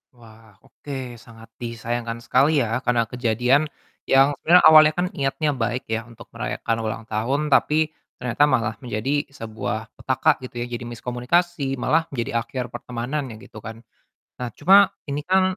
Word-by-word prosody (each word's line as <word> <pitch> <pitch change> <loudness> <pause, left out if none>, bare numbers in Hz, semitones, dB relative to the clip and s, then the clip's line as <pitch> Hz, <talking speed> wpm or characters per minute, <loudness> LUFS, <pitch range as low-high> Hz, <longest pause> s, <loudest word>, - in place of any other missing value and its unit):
Wah, 110 -3 -18
oke. 130 -5 -8
Sangat 115 -1 -15
disayangkan 115 0 -4
sekali 140 +1 +3
ya, 115 +2 -1
karena 120 -1 +2
kejadian 125 +5 +2 0.4
yang 135 +2 +5
sebenernya 175 +2 +5
awalnya 155 0 +8
kan 175 +1 0
niatnya 145 +2 -1
baik 120 -1 -2
ya 115 +1 -2
untuk 115 - -14
merayakan 115 0 -3
ulang 110 0 -4
tahun 135 +8 -1
tapi 155 +3 +3 0.2
ternyata 125 +3 0
malah 115 -5 +1
menjadi 125 +5 -2
sebuah 110 -3 -5
petaka 130 -1 +2
gitu 125 -1 -10
ya, - - -4
jadi 120 - -4
miskomunikasi, 135 +5 -1
malah 160 +5 +1
menjadi 120 -4 -3
akhir 125 +2 -4
pertemanan 125 +4 -4
ya, 110 - -8
gitu 110 - -12
kan. 115 +2 -9 0.6
Nah, 125 - -2
cuma 195 +5 +6 0.2
ini 145 +1 -2
kan, 190 +1 +4
125 Hz, 155 wpm, -23 LUFS, 115-145 Hz, 0.6 s, awalnya